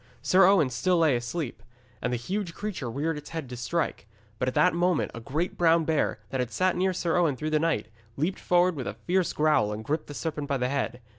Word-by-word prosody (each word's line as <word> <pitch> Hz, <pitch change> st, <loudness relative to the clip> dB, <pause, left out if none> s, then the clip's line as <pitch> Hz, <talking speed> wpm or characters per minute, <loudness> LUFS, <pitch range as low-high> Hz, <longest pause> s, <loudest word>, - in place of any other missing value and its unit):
Sir 185 Hz, 0 st, +5 dB
Owen 180 Hz, -9 st, +4 dB
still 155 Hz, +10 st, +1 dB
lay 160 Hz, -5 st, +4 dB
asleep, 120 Hz, +1 st, -4 dB, 0.4 s
and 125 Hz, -, -1 dB
the 125 Hz, -, 0 dB
huge 180 Hz, -, -4 dB
creature 200 Hz, -, -4 dB
reared 150 Hz, +5 st, -2 dB
his 150 Hz, -, -12 dB
head 160 Hz, -4 st, -5 dB
to 125 Hz, -, -6 dB
strike. 125 Hz, -2 st, -2 dB, 0.3 s
But 125 Hz, -, 0 dB
at 130 Hz, -, -1 dB
that 180 Hz, -, +4 dB
moment 175 Hz, -1 st, +1 dB
a 115 Hz, -, -6 dB
great 150 Hz, +9 st, -3 dB
brown 165 Hz, -1 st, +4 dB
bear, 155 Hz, -7 st, +1 dB
that 130 Hz, -, -2 dB
had 125 Hz, -2 st, -1 dB
sat 185 Hz, +7 st, +1 dB
near 185 Hz, +1 st, +1 dB
Sir 175 Hz, -2 st, -1 dB
Owen 165 Hz, -6 st, +2 dB
through 155 Hz, +4 st, -3 dB
the 155 Hz, -, +3 dB
night, 160 Hz, -10 st, 0 dB, 0.3 s
leaped 165 Hz, +7 st, -1 dB
forward 180 Hz, 0 st, +3 dB
with 130 Hz, -6 st, -4 dB
a 100 Hz, -, -4 dB
fierce 175 Hz, -, 0 dB
growl, 150 Hz, -9 st, +2 dB
and 105 Hz, +1 st, -5 dB
gripped 155 Hz, +4 st, -2 dB
the 145 Hz, -, -8 dB
serpent 150 Hz, -2 st, -3 dB
by 140 Hz, -1 st, 0 dB
the 125 Hz, 0 st, 0 dB
head. 130 Hz, -3 st, -2 dB
155 Hz, 235 wpm, -27 LUFS, 125-175 Hz, 0.4 s, Sir